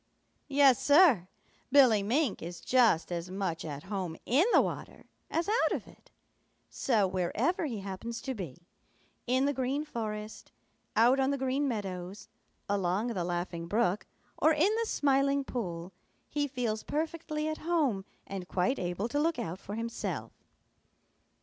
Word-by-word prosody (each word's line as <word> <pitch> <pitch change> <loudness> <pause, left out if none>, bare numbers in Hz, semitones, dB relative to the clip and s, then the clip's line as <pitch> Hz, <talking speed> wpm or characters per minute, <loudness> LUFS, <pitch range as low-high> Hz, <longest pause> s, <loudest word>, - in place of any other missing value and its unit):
Yes, 275 -3 +5
Sir, 285 - +6 0.4
Billy 255 -7 +6
Mink 240 +3 0
is 170 +1 -6
just 230 -10 +3
as 170 +1 -3
much 185 -4 -3
at 145 -2 -6
home 190 -4 -4
in 290 - +4
the - - +7
water - - -3 0.2
as 330 +3 -1
out 445 +4 +2
of - - -3
it. - - -18 0.6
So, 220 -7 +2
wherever 210 - 0
he 225 -7 -4
happens 200 +4 -5
to 265 - -2
be, 175 - -8 0.6
in 260 +2 +3
the 285 - +1
Green 265 +3 -1
Forest, 215 -5 -5 0.4
out 240 +5 +5
on 265 0 +2
the 280 - 0
Green 265 +2 0
Meadows, 195 -3 -5 0.4
along 200 +3 0
the 190 -7 -2
Laughing 175 -1 -3
Brook, 210 0 +1 0.3
or 315 - +5
in 350 +8 +3
the 460 - -1
Smiling 275 0 +2
Pool, 180 -9 -5 0.4
he 290 -1 0
feels 240 -5 -2
perfectly 310 0 -3
at 310 0 -3
home 300 - +1 0.2
and 190 -2 -6
quite 185 +10 0
able 180 +4 -2
to 290 +5 -1
look 325 +2 +1
out 170 +3 -4
for 205 - -7
himself. 230 +1 -4
230 Hz, 150 wpm, -30 LUFS, 185-280 Hz, 0.6 s, the